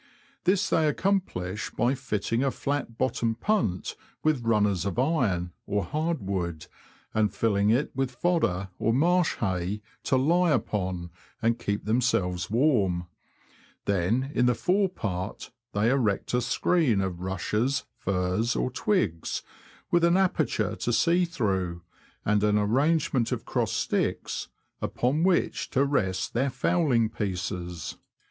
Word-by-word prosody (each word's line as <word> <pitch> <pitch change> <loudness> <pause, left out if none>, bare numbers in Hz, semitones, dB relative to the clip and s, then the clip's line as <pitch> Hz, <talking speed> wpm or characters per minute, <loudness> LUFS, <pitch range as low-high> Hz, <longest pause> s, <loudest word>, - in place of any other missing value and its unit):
This 185 +1 +3
they 160 -1 +3
accomplish 150 - -1
by 120 +2 +1
fitting 120 -2 -1
a 135 - +2
flat 140 -4 -3
bottomed 115 -3 0
punt 190 - 0 0.3
with 155 -5 +2
runners 105 -5 +2
of 100 -2 -3
iron, 115 - +1 0.2
or 100 0 0
hard 155 - -2
wood, 85 -5 -2 0.5
and 105 -2 +2
filling 100 -1 +1
it 125 +7 +1
with 135 -1 0
fodder, 125 - 0
or 115 - +2
marsh 175 +4 +3
hay, 95 0 -2 0.2
to 130 - +3
lie 170 +7 +3
upon, 95 - -1 0.3
and 115 0 +1
keep 100 0 -2
themselves 100 -7 +1
warm; 100 - +2 0.8
then, 100 +8 +1
in 125 - +3
the 125 - +3
fore 190 +1 +2
part, 95 - -4 0.2
they 105 +4 +2
erect 115 -8 0
a 125 - +3
screen 135 - +2
of 95 -3 -2
rushes, 105 +8 -1 0.2
furze, 95 +5 0
or 130 - 0
twigs, 125 - 0 0.5
with 175 -1 +3
an 170 +1 +5
aperture 190 -1 +1
to 120 - -1
see 175 +8 +3
through, 95 - -2 0.4
and 105 0 +2
an 105 0 +3
arrangement 130 +3 +2
of - - -3
crossed - - 0
sticks, - - -1 0.3
upon 135 +6 0
which 180 0 +1
to 135 +1 +2
rest 95 -10 0
their 135 +4 +1
fowling 130 -5 +2
pieces. 90 -5 -4
115 Hz, 135 wpm, -27 LUFS, 95-145 Hz, 0.8 s, an